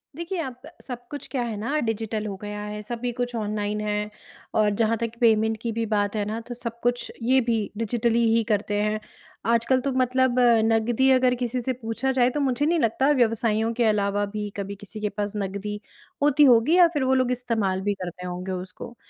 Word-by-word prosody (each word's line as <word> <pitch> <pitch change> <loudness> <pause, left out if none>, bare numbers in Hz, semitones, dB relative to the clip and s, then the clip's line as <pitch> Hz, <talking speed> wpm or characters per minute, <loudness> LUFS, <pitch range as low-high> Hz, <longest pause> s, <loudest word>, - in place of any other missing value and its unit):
देखिए 340 +2 -4
अब 255 -4 -7 0.2
सब 245 -2 -8
कुछ 290 - -6
क्या 265 - -1
है 230 -2 -3
ना 255 +9 -1
डिजिटल 220 -1 -2
हो 200 - -4
गया 210 0 -5
है 210 0 -5
सभी 240 +3 -3
कुछ 245 0 -3
ऑनलाइन 210 -1 -2
है। 210 0 -2 0.5
और 210 -1 +4
जहाँ 225 +1 +2
तक 230 0 -2
पेमेंट 220 -1 +3
की 235 - -2
भी 230 +1 -1
बात 205 -1 0
है 210 - 0
ना, 215 +2 -3
तो 240 +2 -8
सब 235 -1 -6
कुछ 245 0 0
ये 255 +3 +4
भी 225 -3 0
डिजिटली 235 +1 +1
ही 230 - +3
करते 205 -1 0
हैं। 210 +1 0 0.5
आजकल 235 +3 +3
तो 275 +2 -1
मतलब 255 0 +2 0.3
नकदी 225 +3 +2
अगर 255 -1 +4
किसी 245 0 -2
से 260 +2 -1
पूछा 235 +2 -2
जाए 250 -2 +3
तो 295 - -3
मुझे 275 0 +1
नहीं 335 +2 +2
लगता 265 +2 +2
व्यवसाइयों 230 -3 +2
के 240 +1 0
अलावा 205 -1 +1
भी 210 -1 -3
कभी 200 0 -4
किसी 205 +2 -9
के 210 - 0
पास 205 0 -3
नकदी 200 +1 -4 0.4
होती 290 0 +5
होगी 245 +6 +5
या 355 -2 +8
फ़िर 290 -4 0
वो 260 0 +2
लोग 255 -1 +2
इस्तेमाल 220 -6 0
भी 205 +1 0
करते 180 0 -6
होंगे 180 +1 -5
उसको। 185 +5 -7
230 Hz, 205 wpm, -25 LUFS, 210-250 Hz, 0.5 s, या